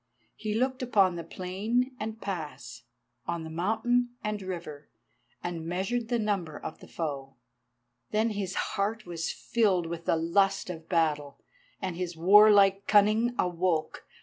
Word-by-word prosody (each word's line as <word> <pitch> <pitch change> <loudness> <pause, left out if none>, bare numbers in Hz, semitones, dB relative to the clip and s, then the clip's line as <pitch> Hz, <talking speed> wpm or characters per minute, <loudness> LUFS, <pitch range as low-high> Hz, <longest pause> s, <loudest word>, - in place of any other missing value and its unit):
He 215 -1 -3
looked 255 +3 0
upon 195 -8 +2
plain 220 +8 -1
and 220 +1 -5
pass, 165 - -6 0.4
on 160 -2 -4
mountain 240 +7 +1
and 210 -1 -2
river, 170 -6 -7 0.5
and 170 -2 -4
measured 195 +7 -1
the 240 0 +1
number 195 -8 -1
of - - -7
the - - -13
foe. 140 -4 -5 0.7
Then 220 +2 +1
his 200 -3 -3 0.2
heart 215 +2 -1
was 170 -2 -3
filled 200 -7 +1
with 165 0 -6
the - - +3
lust 180 +3 +1
of 165 -2 -10
battle, 150 -4 0 0.4
and 185 -3 -3
his 175 -1 -4
warlike 200 +2 +6
cunning 215 +4 +4
awoke. 175 -3 -1
190 Hz, 135 wpm, -29 LUFS, 165-215 Hz, 0.7 s, warlike